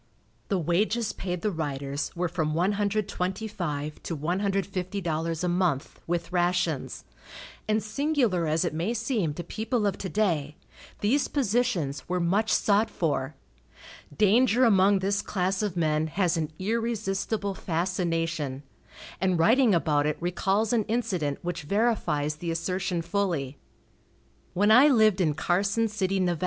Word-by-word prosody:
The 195 - 0
wages 205 +7 0
paid 180 -2 -4
the 210 - +1
riders 145 -3 -3
were 180 +1 0
from 160 -3 -2
$125 190 -4 -2
to 165 - -4
$150 180 -1 -2
a - - +1
month, 175 -6 0
with 170 0 -2
rations, 175 -4 0 0.6
and 215 0 +1
singular 230 - 0
as 155 +3 +1
it 170 - -2
may 175 +9 -1
seem 215 - -1
to 175 - -5
people 220 +5 -2
of 200 -2 -1
to 190 - -4
day, 165 -9 0 0.5
these 260 +8 +2
positions 220 - -1
were 180 0 0
much 195 +6 +1
sought 210 +2 +3
for. 145 -3 -2 0.8
Danger 235 +4 +4
among 200 -2 +5
this 200 +2 0
class 190 0 -1
of 205 -4 -2
men 155 -1 +1
has 175 +2 0
an 155 -2 -2
irresistible 210 -1 -1
fascination, 165 -5 -2 0.6
and 185 -1 +1
writing 225 +5 +4
about 150 -3 +2
it 150 - -1
recalls 195 +5 0
an 225 -3 +2
incident 195 - -1
which 175 0 -3
verifies 155 -6 0
the 170 +2 -5
assertion 175 +1 -2
fully. 165 -8 -2 1.0
When 205 +4 +3
I 250 +6 +8
lived 215 -8 +4
in 155 -4 +1
Carson 200 +7 +1
City, 195 -2 -1
Nev. 175 -3 0
185 Hz, 135 wpm, -27 LUFS, 165-210 Hz, 1.0 s, I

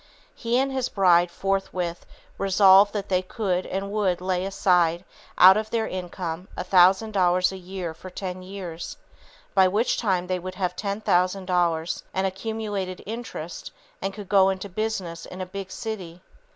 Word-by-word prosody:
He 235 0 -1
and 270 +1 +1
his 260 -2 -1
bride 175 -3 +4
forthwith 185 -2 -2 0.3
resolved 195 +1 +6
that 205 -2 -3
they 185 -1 +1
could 185 -1 -2
and 195 +1 -3
would 200 -4 0
lay 185 0 -1
aside 180 -3 +2 0.3
out 190 +2 +9
of 215 0 -2
their 225 -1 0
income 180 -1 -5
a - - -2
thousand 190 +4 +4
dollars 180 -2 +3
a - - -7
year 180 -2 -6
for 185 +3 -11
ten 185 0 -6
years, 185 -3 -7 0.6
by 190 -1 +5
which 210 +6 +1
time 185 -5 0
they 185 0 -2
would 185 +1 -7
have 180 -2 -2
ten 200 +1 -3
thousand 185 0 +1
dollars 175 -2 0
and 190 0 +1
accumulated 195 -1 -4
interest 215 -7 -6 0.3
and 195 - -2
could 200 0 -9
go 195 -1 +5
into 190 +1 -3
business 190 -4 -4
in 185 - -9
a 185 - -3
big 190 +1 -7
city. 185 -5 -6
190 Hz, 165 wpm, -25 LUFS, 180-200 Hz, 0.6 s, out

